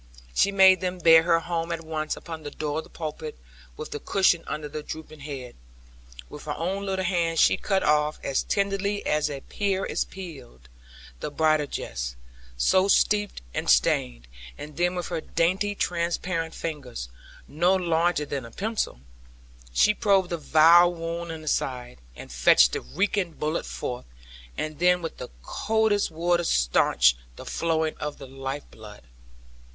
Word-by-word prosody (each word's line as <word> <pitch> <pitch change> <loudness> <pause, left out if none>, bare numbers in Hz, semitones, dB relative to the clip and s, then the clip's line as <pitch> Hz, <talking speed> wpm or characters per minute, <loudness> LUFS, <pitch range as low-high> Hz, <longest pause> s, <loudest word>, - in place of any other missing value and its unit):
She 200 - +3
made 190 -1 +6
them 185 0 -2
bear 165 -2 +7
her 165 0 +2
home 170 0 -3
at 165 -1 -4
once 155 -1 -3
upon 165 -1 -8
the 145 - -6
door 150 +1 -3
of - - -6
the - - -17
pulpit, 155 -1 -6 0.4
with - - -7
the 145 - -4
cushion 180 -2 +2
under 150 -1 -4
the 150 +1 -6
drooping 155 0 -9
head. 140 -4 -7 0.7
With - - -11
her - - -3
own 195 +4 -2
little 190 -1 -1
hands 170 -3 0
she - - +5
cut 195 -1 0
off, 150 0 +2
as 135 - 0
tenderly 200 0 -1
as 150 0 +1
a 140 -2 -6
pear 195 +2 -2
is - - -1
peeled, 135 - -11 0.5
the - - -4
bridal 155 0 +2
dress, - - -5 0.4
so 185 - +3
steeped 205 - +2
and - - -2
stained, - - +2 0.3
and 150 0 -9
then 175 +3 +1
with 180 -1 -4
her 170 -2 -2
dainty 190 +7 0
transparent 170 -2 -2
fingers 130 - -5 0.4
(no 175 +6 +2
larger 170 -3 +1
than 140 -2 -4
a 115 - -9
pencil) 210 - -3 0.7
she 210 - +4
probed 195 -4 +2
the 170 - -1
vile 165 +3 +6
wound 170 0 -5
in 160 -1 -7
the - - -12
side, 125 - -2 0.2
and - - -10
fetched - - +5
the - - -3
reeking 190 0 -1
bullet 155 +2 -2
forth; 125 - -5 0.5
and 155 -1 -4
then 180 0 +3
with 165 - -5
the - - -7
coldest 220 -2 +1
water 170 +2 +1
stanched - - +3 0.2
the - - -10
flowing 160 -1 -1
of 150 -1 -5
the 140 - -9
life 135 +2 -5
blood. 105 - -13
165 Hz, 165 wpm, -26 LUFS, 145-180 Hz, 0.7 s, bear